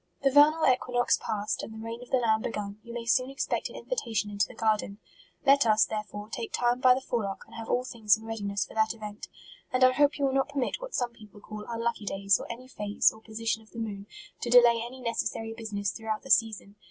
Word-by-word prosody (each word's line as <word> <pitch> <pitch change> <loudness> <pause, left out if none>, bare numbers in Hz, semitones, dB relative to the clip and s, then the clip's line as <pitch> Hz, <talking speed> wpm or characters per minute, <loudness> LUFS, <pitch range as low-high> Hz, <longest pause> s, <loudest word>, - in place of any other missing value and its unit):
The 275 - +4
vernal 300 +3 +6
equinox 245 -1 +2
past, 210 -1 -2
and - - -7
the - - -8
reign 230 +2 -6
of 245 - -12
the 260 - +3
Lamb 220 -3 +2
begun, 205 -2 -4
you 235 - -11
may 235 0 -5
soon 255 +3 +2
expect 275 - -2
an - - -12
invitation 230 - -2
into 205 0 +1
the 250 - -13
garden. 215 -3 0 0.5
Let 275 -2 +5
us, 215 0 +5
there 215 -1 -3
fore, 210 0 -9
" - - -32
take 230 -2 -5
time 245 0 +1
by 255 -1 +6
the 265 - -3
forelock" 210 -6 -3
and - - -19
have 230 -1 -7
all 250 - +1
things 225 -4 +2
in 220 - -13
readiness 200 -3 -2
for - - -14
that 220 +1 +1
event. 210 -1 -8 0.4
And 255 0 +2
I 255 - +8
hope 290 +2 +3
you 285 - +1
will 265 - +1
not 270 +1 +1
permit 285 - -2
what - - -6
some 240 -1 -1
peo 220 -2 -14
ple 205 0 -16
call 210 0 -8
unlucky 230 -2 -2
days, 195 -1 +2
or - - -6
any 250 +2 -9
phase, 210 -5 +1
or 220 - -15
po 220 - -15
sition 225 0 -1
of 220 - -20
the - - -13
moon, 205 -3 -5 0.3
to 240 - -3
delay 240 -1 +6
any 255 +2 -9
necessary 225 -1 -2
business 210 -3 -3
throughout 220 0 -4
the 270 - -5
season. 215 -3 +2
225 Hz, 250 wpm, -28 LUFS, 215-250 Hz, 0.5 s, I